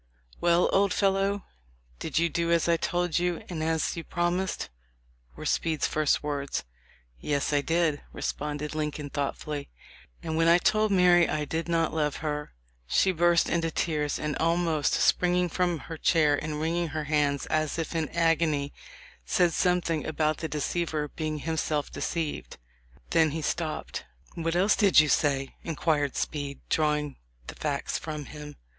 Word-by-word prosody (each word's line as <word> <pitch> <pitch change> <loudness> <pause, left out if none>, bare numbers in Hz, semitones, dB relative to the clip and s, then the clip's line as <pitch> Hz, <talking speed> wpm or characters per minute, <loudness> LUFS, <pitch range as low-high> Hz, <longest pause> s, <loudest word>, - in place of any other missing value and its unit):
"Well, 175 0 +4
old 195 -1 +3
fellow, 195 0 +1 0.5
did 155 - -3
you 170 +1 +4
do 170 +1 -1
as 170 -1 +3
I 170 - +4
told 175 0 0
you 175 -1 -1
and 170 -3 -4
as 160 0 0
you 165 - -5
promised?" 175 +3 -1 0.7
were - - -8
Speed's 160 -2 0
first 155 -1 +1
words. 140 -2 -2 0.6
"Yes, 145 0 -1
I 145 - +3
did," 165 -1 +1
responded 150 +1 -4
Lincoln, 150 -2 -3
thoughtfully, 145 0 -3 0.5
"and 160 - -3
when 165 0 +3
I 170 +1 +7
told 215 +3 +2
Mary 180 -2 +5
I 150 -1 -1
did 165 +3 -3
not 165 -1 +1
love 150 -2 0
her, 150 -1 -3 0.4
she 190 - +3
burst 175 -1 +3
into 165 -1 0
tears 150 -3 -1
and 150 -1 -2
almost 165 -2 +1
springing 180 0 +2
from 175 0 0
her 160 +2 -8
chair 155 -4 +4
and 150 +1 -4
wringing 170 +2 0
her 155 0 -3
hands 145 -2 +1
as 155 0 0
if 165 0 -3
in 160 -2 -1
agony, 165 -4 +1 0.5
said 170 - +2
something 175 -3 +1
about 155 -1 0
the 160 - -3
deceiver 155 0 -2
being 155 0 -3
himself 155 -1 -2
de - - -7
ceived." 165 -3 -3 0.5
Then 160 -2 +4
he 155 +1 -4
stopped. 160 -1 -3 0.3
"What 165 0 -2
else 195 +4 +4
did 200 -6 +5
you 155 -1 +4
say?" 135 -2 +1
inquired 150 -3 0
Speed, 145 -2 -3
drawing 150 -2 0 0.3
the - - -7
facts 145 -2 -2
from 150 -2 -5
him. 150 0 -9
160 Hz, 160 wpm, -28 LUFS, 150-170 Hz, 0.7 s, I